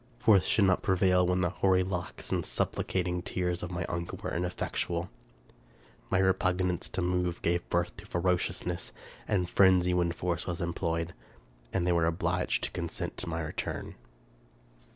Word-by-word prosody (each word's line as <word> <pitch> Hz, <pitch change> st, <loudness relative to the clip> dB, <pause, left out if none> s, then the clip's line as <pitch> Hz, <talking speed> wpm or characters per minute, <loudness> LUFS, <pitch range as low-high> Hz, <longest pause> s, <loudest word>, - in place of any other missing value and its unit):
Force 105 Hz, -7 st, +5 dB
should 105 Hz, -2 st, +3 dB
not 95 Hz, -1 st, +3 dB
prevail 90 Hz, -2 st, +3 dB
when 90 Hz, 0 st, +2 dB
the 85 Hz, -2 st, +1 dB
hoary 95 Hz, 0 st, +3 dB
locks 90 Hz, -2 st, -4 dB
and -, -, +1 dB
supplicating 90 Hz, -1 st, 0 dB
tears 90 Hz, -1 st, -2 dB
of 90 Hz, -, -4 dB
my 85 Hz, -1 st, -3 dB
uncle 85 Hz, 0 st, -4 dB
were -, -, -3 dB
ineffectual. 90 Hz, 0 st, -2 dB, 1.0 s
My 95 Hz, -, +2 dB
re 95 Hz, 0 st, +4 dB
pugnance 90 Hz, -1 st, -1 dB
to 95 Hz, -, -1 dB
move 90 Hz, -1 st, 0 dB
gave 85 Hz, +1 st, 0 dB
birth 85 Hz, 0 st, 0 dB
to -, -, -11 dB
ferociousness 90 Hz, 0 st, -1 dB, 0.3 s
and 90 Hz, -4 st, +1 dB
frenzy 90 Hz, -1 st, +4 dB
when 90 Hz, -1 st, +2 dB
force 85 Hz, 0 st, -2 dB
was 85 Hz, -1 st, -2 dB
employed, 85 Hz, 0 st, -2 dB, 0.6 s
and 90 Hz, -2 st, 0 dB
they 90 Hz, -, +3 dB
were 85 Hz, -1 st, +3 dB
obliged 85 Hz, +2 st, 0 dB
to -, -, -1 dB
consent -, -, -4 dB
to -, -, -2 dB
my -, -, -2 dB
return. -, -, -4 dB
90 Hz, 160 wpm, -30 LUFS, 85-95 Hz, 1.0 s, Force